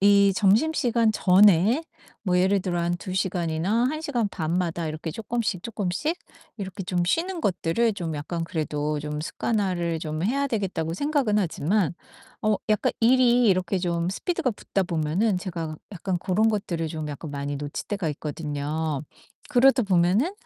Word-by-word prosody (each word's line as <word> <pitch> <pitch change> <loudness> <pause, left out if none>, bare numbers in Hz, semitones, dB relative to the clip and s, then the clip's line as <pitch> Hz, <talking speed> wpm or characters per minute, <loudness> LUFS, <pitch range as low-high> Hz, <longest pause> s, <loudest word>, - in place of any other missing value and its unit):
이 200 0 +5
점심시간 230 +2 +3
전에 200 - +5 0.4
뭐 180 -4 +1
예를 190 +2 +3
들어 180 -2 -2
한 170 0 0
2 185 -1 -5
시간이나 185 +3 0
1 310 +3 -4
시간 245 -9 0
반마다 170 -1 -2
이렇게 155 +1 -4
쪼끔씩 225 -1 -2
쪼끔씩 230 - -2 0.4
이렇게 190 -1 -5
좀 180 -1 -1
쉬는 340 - 0
것들을 200 - +1
좀 170 -5 -4
약간 165 +3 -3
그래도 150 -2 -2
좀 150 0 -4
습관화를 175 -4 -1
좀 155 0 -3
해야 275 +8 +1
되겠다고 190 - -2
생각은 275 - +1
하지만 180 0 0 0.5
어 215 -1 +3
약간 215 -1 +2
일이 245 0 +5
이렇게 185 -1 +2
좀 175 -1 -1
스피드가 275 - -1
붙다 200 -2 -2
보면은 175 +4 0
제가 165 -4 -5 0.2
약간 185 0 -2
고런 200 +5 +2
것들을 175 -6 -2
좀 155 -1 -5
약간 145 +2 -6
많이 145 0 -3
놓칠 145 0 -5
때가 200 -6 -1
있거든요. 150 0 -3 0.5
그러다 265 -1 +5
보면은 195 - +2
185 Hz, 325 characters per minute, -25 LUFS, 165-220 Hz, 0.5 s, 이